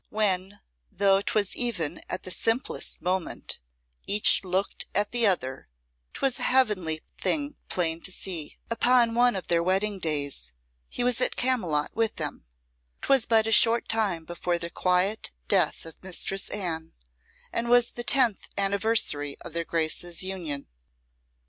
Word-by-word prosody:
When, 200 -2 0 0.3
though 195 0 +3
'twas 205 -1 0
even 185 - -2
at 185 - -4
the 185 - -5
simplest 225 +7 -1
moment, 185 0 -2 0.5
each 205 0 +4
looked 190 +1 -2
at 205 +1 0
the 240 -2 +4
other, 130 - -1 0.5
'twas 270 -2 0
a - - -1
heavenly 200 -12 +1 0.2
thing 290 -1 -1
plain 165 -2 0
to - - -1
see. 175 -5 -2
Upon 240 0 +3
one 245 0 +3
of 190 - -5
their 170 -1 +2
wedding 195 +3 0
days 140 - -2 0.4
he - - -3
was 245 0 +1
at - - +2
Camylott 185 -13 0
with 225 0 0
them. - - -4 0.6
'Twas 270 -4 +3
but 220 -1 +4
a 225 - -1
short 230 +1 +5
time 200 -8 0
before 175 +1 -2
the 170 0 -4
quiet 185 - 0
death - - +1
of 165 - -11
Mistress 190 +1 -1
Anne, 165 -5 -3 0.6
and 235 0 -2
was 245 -1 +4
the 240 - -5
tenth 240 -3 +1
anniversary 200 -8 +2
of - - -10
their 170 0 -1
Graces' 165 +2 0
union. 170 -7 -5
195 Hz, 150 wpm, -26 LUFS, 170-225 Hz, 0.6 s, short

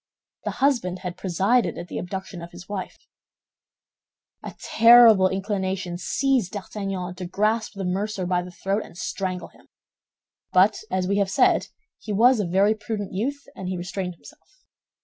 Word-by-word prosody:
The - - 0 0.2
husband 225 -10 +1
had 180 -1 -3
presided 195 +7 +1
at 175 - -6
the - - -5
abduction 190 0 -6
of 170 - -8
his 175 +2 -12
wife. 200 -2 -5 1.4
A - - -8
terrible 230 -4 +7
inclination 190 -2 -3
seized 250 -1 0
D'Artagnan 195 -3 -4
to 180 0 -7
grasp 215 +5 0
the 195 -1 -4
mercer 195 +1 -2
by 180 0 +1
the 180 - -8
throat 195 +3 -2
and - - -14
strangle 185 -1 -4
him; - - -23 0.8
but, 190 +4 +4
as 185 -1 -1
we 200 +1 +1
have 200 -1 +1
said, 190 - +3 0.3
he 215 - -7
was 235 +4 +5
a 200 - 0
very 195 +4 +3
prudent 210 -2 -5
youth, 275 +9 -2
and 190 - -6
he 185 - -2
restrained 180 0 -4
himself. - - -17
190 Hz, 160 wpm, -24 LUFS, 180-215 Hz, 1.4 s, terrible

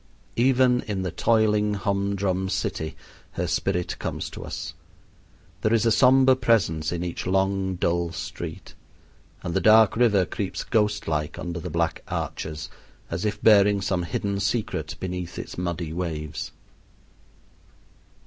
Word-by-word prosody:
Even 125 0 +4
in 100 -3 -2
the 90 - -2
toiling 105 -1 +2
hum 100 0 -1
drum 95 -1 -1
city 90 -4 -2 0.4
her - - -2
spirit 90 -2 -1
comes - - -4
to - - -8
us. - - -6 0.9
There 110 +2 +3
is 115 - +2
a 115 - +4
somber 130 +3 +6
presence 105 -11 +1
in 85 0 -2
each 90 0 -4
long, 95 0 +1
dull 85 -1 0
street; 80 - -7 0.7
and 85 - -3
the - - +1
dark 110 0 +6
river 110 -6 +4
creeps 100 0 -4
ghostlike 105 -9 0
under 85 -1 -4
the 90 - -5
black 85 +1 -1
arches, 75 -1 -4 0.4
as 85 +4 -2
if 105 - -1
bearing 105 -2 +6
some 95 -2 0
hidden 100 +4 -2
secret 95 -7 -2
beneath 90 -1 -5
its - - -6
muddy 85 -2 -3
waves. 80 -4 -4
95 Hz, 140 wpm, -25 LUFS, 85-105 Hz, 0.9 s, somber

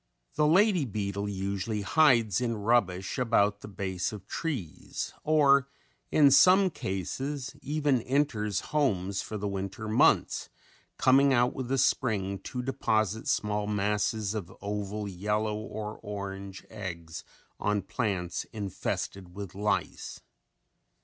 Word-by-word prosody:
The 150 - +2
lady 185 +1 +4
beetle 100 -3 -3
usually 100 +2 -2
hides 120 - +4
in 115 -2 0
rubbish 100 -4 +1
about 105 -4 +2
the - - -8
base 95 -3 -3
of 105 -3 -9
trees 125 - -4
or 140 -3 +4 0.4
in 145 -2 +5
some 185 +7 +6
cases 135 - -4
even 145 -3 +1
enter 130 -5 0
homes 100 -7 0
for 110 - -5
the 105 0 -3
winter 100 +2 -4
months, 110 - +3 0.5
coming 135 +1 +5
out 120 +1 +3
with 130 -2 -4
the 135 +2 0
spring 105 -7 +1
to 125 +6 -5
deposit 110 -4 0
small 105 0 0
masses 105 0 0
of 95 -5 -5
oval 105 +1 -3
yellow 105 +3 -1
or 105 0 -6
orange 100 -1 -6
eggs 85 -6 -6 0.4
on 105 -2 0
plants 95 -3 -2
infested 95 -3 -4
with 100 -3 -7
lice. 105 +2 -2
105 Hz, 125 wpm, -29 LUFS, 100-130 Hz, 0.5 s, some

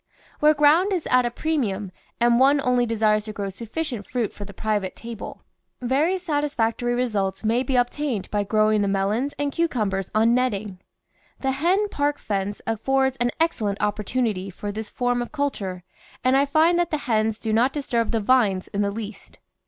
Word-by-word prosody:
Where 305 +1 +5
ground 310 +7 +4
is 360 -4 -1
at 250 -1 +4
a - - -1
premium 230 - -2 0.3
and 235 0 +4
one 275 +2 +5
only 250 -2 +2
desires 215 -1 +2
to 215 - -6
grow 200 -1 -4
sufficient 230 - -5
fruit 240 -4 -1
for 205 - -8
the 200 - -9
private 205 -1 -2
table, 230 -2 -8 0.4
very 280 +9 +1
satisfactory 280 -8 -1
results 215 -6 -1
may 230 +3 +2
be 265 0 -1
obtained 245 -3 0
by 205 -1 +1
grow 215 +1 +2
ing 215 -1 +2
the 200 - +1
melons 205 +8 0
and 285 0 -1
cucumbers 215 - -1
on 225 +2 +4
netting. 215 -6 -1 0.6
The 270 - +1
hen 355 +10 +1
park 290 -4 0
fence 200 0 -3
affords 265 +4 +1
an 240 0 +1
excellent 220 -12 0
opportunity 210 -1 -1
for 205 +2 -5
this 215 +1 -6
form 245 -1 0
of 240 - -5
culture, 205 -12 -3 0.4
and 255 +1 +3
I 280 +1 +3
find 325 +4 +3
that 345 -1 +1
the 305 - 0
hens 220 -2 +1
do 220 -1 -3
not 240 +4 +3
disturb 240 -6 -1
the 230 - +1
vines 205 -5 +2
in 200 - -2
the 200 - +1
least. 210 0 -8
235 Hz, 185 wpm, -24 LUFS, 210-275 Hz, 0.6 s, Where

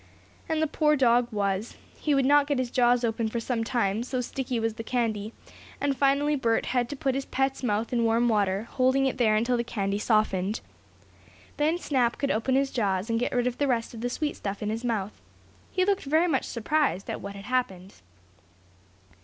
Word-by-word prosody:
And 315 -1 +1
the - - +4
poor 300 0 +2
dog 245 -3 +3
was. 200 +1 -2 0.2
He 295 -2 +1
would 270 -1 +2
not 290 +1 +5
get 285 -2 0
his 255 -2 -2
jaws 245 0 +3
open 225 -1 0
for 235 - -2
some 230 0 -2
time, 225 -3 0
so 255 +1 -3
sticky 250 0 -3
was 225 0 -1
the 225 - -7
candy, 220 -3 -1 0.5
and 280 -1 0
finally 280 +2 +2
Bert 230 -5 +1
had 245 -1 0
to 290 - -4
put 270 -1 -1
his 270 +1 -2
pet's 270 0 -1
mouth 225 0 -1
in 235 -1 +2
warm 230 +1 +2
water, 205 -1 +1
holding 260 +1 +2
it 260 -1 -1
there 220 -3 +4
until 235 +3 +1
the 235 - 0
candy 200 -4 -2
softened. 210 -2 +1 1.0
Then 310 +3 +2
Snap 255 -8 0
could 280 - 0
open 230 +4 0
his 275 0 +1
jaws, 200 -2 -1
and 230 - +1
get 245 - -1
rid 245 -1 +1
of 250 -1 -2
the 285 - +2
rest 235 -3 -1
of 225 - -8
the 245 - -1
sweet 295 +4 -2
stuff 200 +1 -5
in 210 - -1
his 225 +2 -4
mouth. 215 -4 -3 0.5
He 370 -1 +1
looked 400 -4 0
very 315 +5 +3
much 275 -6 0
surprised 240 - 0
at - - -4
what 200 0 -7
had 200 0 -9
happened. 200 -7 -3
240 Hz, 210 wpm, -27 LUFS, 220-270 Hz, 1.0 s, not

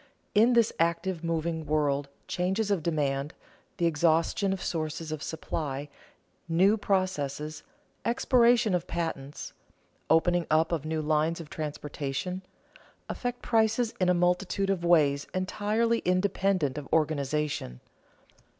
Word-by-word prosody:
In 225 +4 +5
this 235 -2 +3
active, 170 +1 0
moving 165 0 -1
world, 145 -2 +1 0.2
changes 190 +4 0
of 195 -5 +1
demand, 145 -2 -1 0.4
the 170 - +1
exhaustion 165 +4 +2
of 195 - -2
sources 155 -2 -3
of 155 -2 -4
supply, 145 -3 -4 0.6
new 185 +6 +4
processes, 155 -7 -1 0.4
expiration 235 -2 +3
of 175 -2 -1
patents, 160 -5 -4 0.6
opening 175 +1 +3
up 160 +2 +3
of 160 -3 -1
new 155 0 -2
lines 155 +2 +1
of 160 -3 -9
transportation, 150 +3 -4 0.7
affect 245 -1 -4
prices 225 +1 +2
in 180 - +3
a 180 - +4
multitude 180 +3 +1
of 185 -3 -2
ways 150 -5 +3
entirely 215 +5 +1
independent 185 -5 +1
of 140 - -11
organization. 150 - 0
165 Hz, 120 wpm, -28 LUFS, 150-190 Hz, 0.7 s, In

